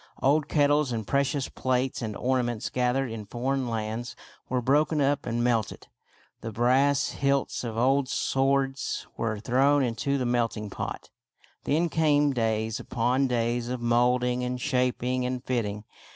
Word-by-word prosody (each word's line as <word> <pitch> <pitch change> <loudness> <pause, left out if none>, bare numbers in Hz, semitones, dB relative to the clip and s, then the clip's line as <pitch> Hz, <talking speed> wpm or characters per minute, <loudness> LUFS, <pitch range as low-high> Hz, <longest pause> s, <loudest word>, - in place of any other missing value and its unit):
Old 145 +3 +2
kettles 145 -2 +2
and 110 -2 -3
precious 140 +1 0
plates 130 0 -1
and 110 -3 -4
orna 130 0 +1
ments 120 -2 -3
gathered 125 0 0
in 110 -2 -7
foreign 130 +2 -2
lands 110 +2 -4 0.3
were 125 - +1
broken 150 +5 +2
up 140 -1 +1
and 120 0 -1
melted. 115 -4 -1 0.5
The 115 - -6
brass 135 +5 +2
hilts 140 -2 0
of 115 -2 -4
old 135 +2 +2
swords 135 0 0
were 110 -2 -2
thrown 135 +5 +3
into 130 +3 -1
the 130 - -1
melting 115 -4 -1
pot. - - -6 0.5
Then 160 +4 +2
came 150 -3 +2
days 110 -2 -1
upon 125 +3 0
days 120 0 -1
of 125 0 -3
molding 125 +1 +2
and 125 0 -2
shaping 125 0 0
and 125 0 -3
fitting. 105 -5 -2
125 Hz, 150 wpm, -27 LUFS, 120-135 Hz, 0.5 s, thrown